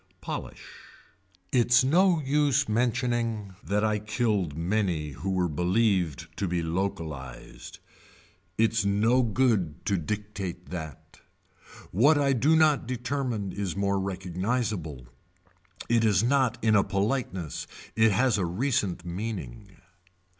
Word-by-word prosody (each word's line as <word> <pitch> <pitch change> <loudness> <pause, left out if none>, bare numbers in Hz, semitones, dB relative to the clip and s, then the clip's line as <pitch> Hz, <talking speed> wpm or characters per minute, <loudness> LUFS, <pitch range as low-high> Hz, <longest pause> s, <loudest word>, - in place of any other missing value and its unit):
Polish. - - -6 0.9
Its 120 0 +4
no 175 +5 +4
use 145 0 +2
mentioning 115 -3 -1
that 105 +1 0
I 105 -1 +1
killed 105 - -1
many 85 -4 -1
who 95 +8 -5
were 90 -2 +1
believed 90 - +1
to 100 - -1
be 85 -1 -1
localized. 80 -7 -5 0.8
Its 115 0 +2
no 110 +6 +3
good 110 - 0
to 100 - +1
dictate 95 -1 -5
that. 80 -6 -8 0.7
What 140 - +4
I 140 -1 +2
do 140 +6 +3
not 155 -6 +3
determine 125 -5 -2
is 95 -3 -3
more 100 0 0
recognizable, 95 - -3 0.8
it 115 -1 +3
is 105 -3 +3
not 125 -1 +2
in 110 -1 +4
a 100 - +5
politeness, 95 - -2 0.3
it 110 0 +4
has 115 +1 +2
a - - 0
recent 95 -2 -1
meaning. 105 +3 -5
105 Hz, 120 wpm, -27 LUFS, 90-120 Hz, 0.9 s, a